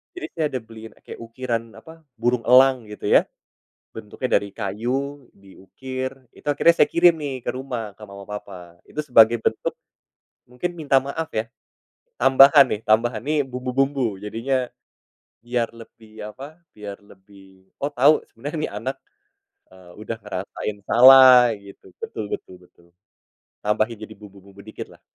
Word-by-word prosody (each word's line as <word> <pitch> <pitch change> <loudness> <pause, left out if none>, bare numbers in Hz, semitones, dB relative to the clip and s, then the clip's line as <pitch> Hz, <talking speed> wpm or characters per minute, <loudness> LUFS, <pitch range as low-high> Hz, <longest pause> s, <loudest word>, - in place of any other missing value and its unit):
jadi 365 - -6
saya 160 - 0
ada 130 - -3
beliin 110 0 -12
kayak - - -10
ukiran, 115 -1 -5
apa, 160 0 -15 0.2
burung 120 0 0
elang, 130 -1 +5
gitu 105 - -11
ya, - - +5 0.7
bentuknya 110 +4 -6
dari 100 - -8
kayu 125 +7 -4
diukir. 130 +7 -8 0.2
Itu - - -18
akhirnya 170 +4 +4
saya - - +6
kirim 175 0 +5
nih, 140 -4 -5
ke - - -1
rumah, 120 -6 -6
ke 110 - -14
mama 100 -1 -11
papa, 90 -4 -9
itu 150 - -9
sebagai 120 -5 +5
bentuk 110 - -2 0.8
mungkin 125 +9 -4
minta 145 -3 +1
maaf 160 +4 -5
ya, 110 - 0 0.8
tambahan 135 +2 +7
nih 105 - -2
tambahan 110 +1 +2
nih 150 +1 0
bumbu-bumbu, 130 -2 -2
jadinya 125 +5 -2 0.8
biar 120 -1 -1
lebih, 115 -1 -16 0.2
apa, 145 +5 -11 0.2
biar 105 -2 -8
lebih, 95 -1 -20
oh, 140 - -1
tau, 145 +4 +5
sebenernya 145 +7 -7
nih - - -3
anak, 130 +5 -4 0.8
eee, 95 -1 -17
udah 115 +1 -5
ngerasain 100 +1 -5
salah, 130 -1 +8
gitu. 100 -1 -16 0.2
Betul 110 - -5
betul 95 - -7
betul. 85 -1 -25 0.8
Tambahin 110 +2 0
jadi 110 0 -10
bumbu-bumbu 100 -1 -16
dikit 110 - -8
lah. - - -22
120 Hz, 145 wpm, -22 LUFS, 105-135 Hz, 0.8 s, salah